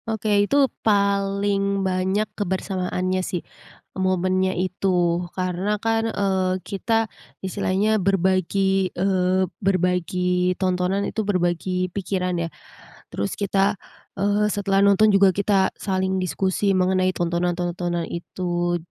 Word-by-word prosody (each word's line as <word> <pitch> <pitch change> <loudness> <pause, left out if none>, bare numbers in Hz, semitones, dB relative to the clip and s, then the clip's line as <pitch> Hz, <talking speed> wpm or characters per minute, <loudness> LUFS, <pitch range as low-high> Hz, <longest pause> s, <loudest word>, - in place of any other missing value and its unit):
Oke 220 -1 -1 0.2
itu 285 - +2 0.2
paling 200 -1 +1
banyak 190 +3 0
kebersamaannya 185 -1 -2
sih, 180 -1 -3 0.6
momennya 185 0 +1
itu 185 +1 -2 0.5
karena 185 +2 -2
kan, 225 0 +1
eee, 190 -3 0
kita 205 +3 -2 0.5
istilahnya 190 +2 0 0.2
berbagi, 190 0 +2
eee, 185 0 +2 0.2
berbagi 180 -1 +1
tontonan 185 +1 0
itu 220 - -2
berbagi 175 -2 0 0.3
pikiran 185 -2 -1
ya, - - -2 0.7
terus 100 0 -2
kita, 200 +1 +1 0.4
eee, 205 +2 +2
setelah 195 -1 +1
nonton 200 +2 +5
juga 195 0 +6
kita 195 -1 +3
saling 190 -1 -1
diskusi 190 +2 0
mengenai 185 0 +2
tontonan-tontonan 175 0 -1
itu 175 0 -2
190 Hz, 105 wpm, -23 LUFS, 180-200 Hz, 0.7 s, juga